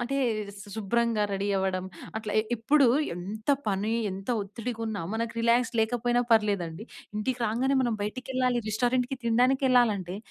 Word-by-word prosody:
అంటే 275 +3 -2 0.4
శు 205 - -11
శుభ్రంగా 225 +1 +1
రెడీ 200 +1 -1
అవ్వడం 190 -1 -1 0.3
అట్లా. 215 -1 -4 0.2
ఎప్పుడూ 275 +4 +4 0.3
ఎంత 210 +7 -7 0.2
పని, 205 +3 0 0.2
ఎంత 195 +3 -8
ఒత్తిడిగా 230 +3 -6
ఉన్న 205 -6 -3
మనకు 230 +1 -2
రిలాక్స్ 235 +1 +3
లేకపోయినా 240 +2 +1
పర్లేదండి. 200 -4 +1 0.3
ఇంటికి 250 +4 -1
రాంగానే 260 +5 +1
మనం 235 -3 0
బయటికెళ్ళాలి 255 +2 -1
రెస్టారెంట్‍కి 245 +4 0
తినడానికి 250 +4 +3
ఎళ్ళాలంటే, 205 -7 +2
225 Hz, 135 wpm, -28 LUFS, 205-245 Hz, 0.4 s, ఎప్పుడూ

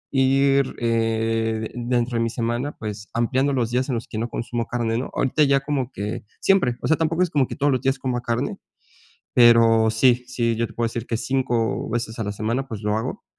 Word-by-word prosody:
ir, 135 0 +3
eh, 115 -1 0
dentro 120 0 -1
de 115 - +1
mi 115 - 0
semana, 120 +5 -2
pues, 105 -1 -6
ampliando 130 +4 +1
los 120 -4 0
días 130 +3 0
en 130 - 0
los 115 - -4
que 110 - -5
no 115 +1 -2
consumo 120 0 -3
carne, 115 -2 -1
¿no? 125 - -3
Ahorita 145 +3 +2
ya 140 -1 +4
como 135 -3 -2
que 105 +1 -5 0.2
siempre, 190 -11 +3
o - - -2
sea, 160 - +3
tampoco 165 +2 +1
es 175 - 0
como 140 -4 +2
que - - -6
todos 145 0 +1
los 130 - 0
días 135 +1 +1
como 125 -2 -2
carne, 120 +3 -2 0.8
pero, 115 -2 +6
sí 125 +2 +3
sí, 120 -2 -1
yo 115 0 0
te - - -13
puedo 115 0 -1
decir 115 +1 -4
que 115 - -2
5, 120 -3 -1
veces 115 0 -3
a 110 - -2
la 105 - -3
semana, 115 +6 -2
pues, 110 -5 -6
lo 105 0 0
hago, 130 - -4
120 Hz, 220 wpm, -23 LUFS, 115-135 Hz, 0.8 s, pero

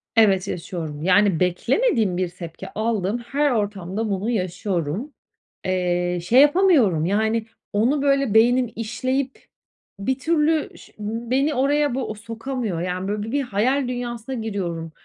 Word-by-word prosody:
Evet, 195 -3 +4
yaşıyorum. 165 -4 -5
Yani, 190 -1 +4
beklemediğim 210 - +1
bir 185 -2 0
tepki 170 -2 -9
aldığım 215 -1 -1
her 280 +4 0
ortamda 205 -1 -2
bunu 200 +4 -1
yaşıyorum. 185 - -2 0.5
Eee, 180 -1 0
şey 245 +9 +6
yapamıyorum, 290 - +4
yani, 220 +3 +1 0.3
onu 250 +8 +2
böyle 275 -5 +2
beynim 240 +2 +4
işleyip 255 +4 -2 0.5
bir 260 +6 -1
türlü 315 +1 +1
ş - - -16
beni 240 +7 -1
oraya 285 0 +2
bu 235 -5 -3
sokamıyor. 225 -3 -4
Yani, 185 +1 -3
böyle 205 0 -2
bi 225 - -5
bir 285 0 +1
hayal 250 +4 0
dünyasına 245 0 -4
giriyorum. 180 -8 -4
220 Hz, 130 wpm, -23 LUFS, 185-260 Hz, 0.5 s, şey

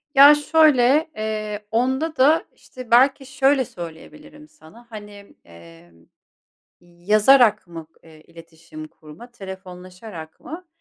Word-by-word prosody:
Ya, 285 +2 +8
şöyle: 295 -1 +2
Eee, 215 -1 -6
onda 265 +7 -2
da, 300 +4 +3
işte, 255 -2 -14
belki 270 +3 +3
şöyle 270 0 0
söyleyebilirim 220 - -13
sana, 235 - -20
hani, 205 -2 -13
emm, 85 0 -19 0.8
yazarak 210 +6 +2
mı, 165 -2 -11 0.2
eee, 160 -1 -18
iletişim 165 -1 -14
kurma, 155 +11 -16
telefonlaşarak 185 -4 -12
mı? 355 +3 -11
215 Hz, 105 wpm, -20 LUFS, 165-270 Hz, 0.8 s, Ya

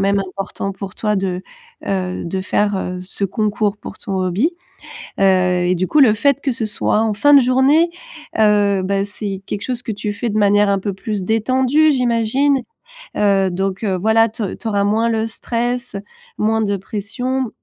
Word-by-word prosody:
même 200 +1 +2
important 195 +1 -5
pour 195 -1 -8
toi 210 -1 0
de, 190 -1 -2 0.4
heu, 185 -2 -2
de 190 +3 -3
faire, 205 +1 0
heu, 180 -1 -4
ce 190 +2 -4
concours 210 0 -1
pour 205 - -10
ton 195 - -5
hobby. 190 - 0 0.7
Heu 180 -2 +3
et 180 - +2
du 185 +1 -1
coup 305 - +2
le 245 -6 +6
fait 280 +5 +1
que 275 - 0
ce 230 -2 -2
soit 210 0 0
en 220 -1 +1
fin 290 +8 +4
de 280 - +9
journée, 265 +7 +3 0.5
heu 205 -2 +3
bah, 195 +1 0
c'est 205 -2 -5
quelque 200 - -4
chose 250 -2 -3
que 225 - -3
tu 210 0 -3
fais 225 +3 -3
de 215 - -2
manière 205 0 +4
un 195 -1 +2
peu 200 0 -3
plus 200 0 -4
détendue, 260 +8 +2
j'imagine? 250 +3 +1 0.6
Heu, 195 -2 +3
donc, 190 +3 -2
heu, 190 -3 0
voilà 220 +3 +3
tu 220 0 -5
au 195 - -3
tu 230 - -8
auras 200 -2 +1
moins 220 +3 +1
le 220 -1 0
stress, 240 0 -3 0.4
moins 220 +1 +1
de 200 -2 0
pression 245 +6 -3
210 Hz, 190 wpm, -18 LUFS, 195-235 Hz, 0.7 s, de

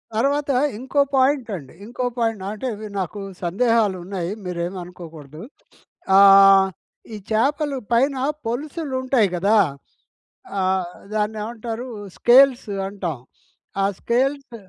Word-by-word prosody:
తర్వాత 280 +4 +1 0.3
ఇంకో 265 +4 0
పాయింట్ 265 -2 +2
అండి. 140 -6 -10
ఇంకో 245 +2 -4
పాయింట్ 225 -4 -1
అంటే 215 +5 -5
మీరు 215 -2 -8
నాకు 190 +3 -5 0.2
సందేహాలు 210 +1 +1
ఉన్నాయి 180 -2 -4 0.2
మీరేమనుకోకూడదు. 170 -4 -7 0.8
ఆహ్, 195 -1 +8 0.5
ఈ - - -5
చాపలు 280 +5 +1
పైన 265 +4 +3 0.3
పొలుసులు 280 +5 -4
ఉంటాయి 255 -5 +2
కదా! 200 +5 +2 1.0
ఆ! - - +1 0.5
దాన్ని 215 0 -1
ఏమంటారు? 235 +2 -6 0.3
స్కేల్స్ 255 0 +5 0.2
అంటాం. 185 -7 -4 0.7
ఆ - - +3
స్కేల్స్ 265 +1 -1
225 Hz, 105 wpm, -22 LUFS, 195-260 Hz, 1.0 s, ఆహ్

